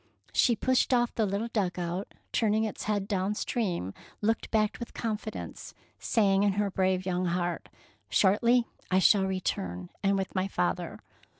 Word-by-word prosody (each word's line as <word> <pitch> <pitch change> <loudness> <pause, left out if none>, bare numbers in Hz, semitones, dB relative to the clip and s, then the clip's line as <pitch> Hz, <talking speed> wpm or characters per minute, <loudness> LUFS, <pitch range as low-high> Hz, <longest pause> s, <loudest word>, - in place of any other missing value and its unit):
She 240 - +4
pushed 255 +3 +2
off 240 -1 +1
the 220 -2 +1
little 200 +4 -2
dug 190 -6 -1
out, 175 +3 -3
and - - -26
turning 220 -1 +2
its 220 - -4
head 205 -2 0
down 195 0 0
stream 180 - -2 0.3
looked 225 +2 0
back 215 -1 +1
with 235 - -7
con 225 -2 -1
fidence, 215 +1 -7 0.2
saying 195 -3 +3
in 200 -1 +3
her 205 0 0
brave 185 -1 +1
young 185 -1 0
heart, 175 0 -1
— - - -29
" - - -41
Shortly 235 +5 +4 0.2
I 185 - +3
shall 190 +1 +5
return, 90 - -3
and 195 0 +2
with 195 0 -3
my 185 0 0
father. 90 - -2
200 Hz, 180 wpm, -29 LUFS, 185-220 Hz, 0.3 s, shall